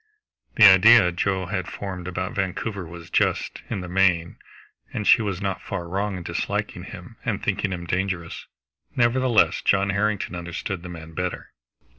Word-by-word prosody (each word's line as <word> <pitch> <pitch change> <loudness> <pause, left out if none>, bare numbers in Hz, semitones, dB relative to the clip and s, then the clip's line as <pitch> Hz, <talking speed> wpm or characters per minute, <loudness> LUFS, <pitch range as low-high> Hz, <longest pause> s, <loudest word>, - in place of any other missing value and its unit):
The 110 - +7
idea 95 0 +7
Joe 95 +1 -1
had 90 -1 -3
formed 90 -3 -6
about 90 0 -3
Vancouver 95 0 -3
was 85 0 -11
just, - - 0
in 95 - -3
the 90 - -7
main, 90 -2 +1 0.5
and 105 - -4
she 115 - +6
was 100 -2 -3
not 95 -1 -2
far 85 - -5
wrong 100 +2 -2
in 90 - -7
disliking - - -3
him - - -11
and - - -2
thinking 95 - -1
him 85 -1 -5
dangerous. 90 -1 -3 0.5
Nevertheless 120 -1 +3
John 100 0 +2
Harrington 100 -1 -1
understood 85 +2 -5
the 90 - -9
man 80 -1 -10
better. 90 +2 -4
95 Hz, 160 wpm, -24 LUFS, 90-100 Hz, 0.5 s, The